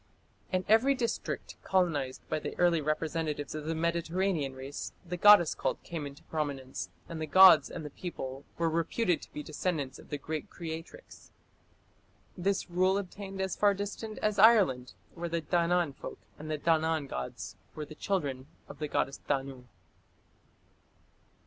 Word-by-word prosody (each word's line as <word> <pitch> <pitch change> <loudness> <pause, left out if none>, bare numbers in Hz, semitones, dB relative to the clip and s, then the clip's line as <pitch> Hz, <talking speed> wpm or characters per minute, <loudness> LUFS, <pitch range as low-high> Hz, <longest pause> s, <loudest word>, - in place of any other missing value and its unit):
In 185 0 0
every 235 +6 +5
district 235 -3 -3
colonized 150 -9 0
by - - -1
the - - -6
early 175 -2 +3
representatives 155 0 -2
of 155 -1 -5
the 160 +1 -1
Mediterranean 170 -2 0
race, 135 +2 -6
the 175 +1 -4
goddess 180 -2 +7
cult - - -2
came 160 -4 -5
into 140 0 -12
prominence, 140 -4 -4 0.2
and 165 -1 -6
the 155 - -2
gods 185 +4 +8
and 160 - -6
the 150 - -6
people 135 -5 -6
were 165 - +1
reputed 170 +3 +1
to - - -12
be 150 - -6
descendants 150 -4 -3
of - - -15
the 145 - -2
great 155 +2 -5
Creatrix. 165 - -8 1.1
This 195 +2 0
rule 185 +2 +2
obtained 195 0 -6
as 190 -1 -1
far 205 -1 +4
distant 205 +2 -5
as 210 -1 +1
Ireland, 190 - +5 0.2
where 170 0 -4
the 165 0 -1
Danann 170 -1 +2
folk - - -8 0.2
and 155 +1 -7
the 155 - -1
Danann 160 0 +2
gods 65 - -5 0.2
were 150 - -4
the 155 - -10
children 145 -7 -2 0.2
of - - -11
the 150 - -2
goddess 140 -1 -1
Danu. 135 -3 -2
165 Hz, 155 wpm, -30 LUFS, 145-185 Hz, 1.1 s, gods